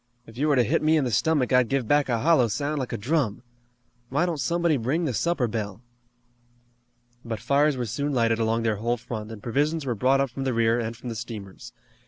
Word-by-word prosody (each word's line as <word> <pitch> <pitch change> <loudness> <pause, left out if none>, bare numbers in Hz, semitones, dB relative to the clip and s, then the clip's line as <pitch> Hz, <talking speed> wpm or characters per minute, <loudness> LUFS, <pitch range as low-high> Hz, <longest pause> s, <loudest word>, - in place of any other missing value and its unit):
"If 115 - -14
you 145 +5 0
were 145 - +3
to 125 - +4
hit 105 - +1
me 155 +1 +3
in 150 - +2
the 125 - -1
stomach 135 +3 +1
I'd 125 -2 +4
give 135 -4 0
back 145 +1 +2
a 115 -2 0
hollow 155 -5 +4
sound 145 +7 -2
like 130 - -4
a - - -2
drum. 125 -2 -1 0.7
Why 145 +7 +1
don't 170 -4 -2
somebody 170 +4 +1
ring 140 +8 -1
the 135 - -1
supper 165 -1 0
bell?" 110 -1 -5 1.4
But 115 -2 -4
fires 145 0 +2
were 125 - -2
soon 140 +7 -2
lighted 115 -3 +1
along 115 0 +1
their 110 -2 0
whole 120 +3 -1
front, 110 -2 -6
and 110 -3 -10
provisions 145 +5 0
were 125 - 0
brought 130 +5 +2
up 135 -2 0
from 135 +2 -5
the 130 -3 -1
rear 115 +1 +2
and 115 0 -4
from 125 - -7
the 115 - -5
steamers. 110 -5 -8
125 Hz, 230 wpm, -25 LUFS, 115-145 Hz, 1.4 s, to